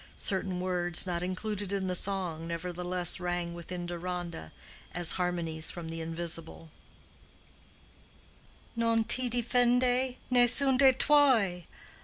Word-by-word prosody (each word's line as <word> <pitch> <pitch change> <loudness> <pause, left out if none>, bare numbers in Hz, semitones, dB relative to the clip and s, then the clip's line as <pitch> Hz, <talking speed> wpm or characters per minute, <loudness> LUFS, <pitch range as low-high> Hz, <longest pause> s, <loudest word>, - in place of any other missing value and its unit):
Certain 190 -2 -1
words 180 -1 +3
not 175 -2 -3
included 195 +2 -4
in 195 -1 -2
the 185 - -1
song 180 -4 -1
nevertheless 175 +1 -2
rang 175 -1 -3
within 175 +1 -7
Deronda 175 - -6 0.4
as 175 -2 +4
harmonies 170 -3 -2
from 170 -2 -6
the 165 0 -6
invisible, 165 -1 -3 2.0
"Non 230 -1 +1
ti 250 +2 +1
difende 245 +1 +1 0.2
Nessun 255 +2 +3
de' 270 -1 +7
tuoi! 245 - +3
180 Hz, 110 wpm, -29 LUFS, 170-230 Hz, 2.0 s, de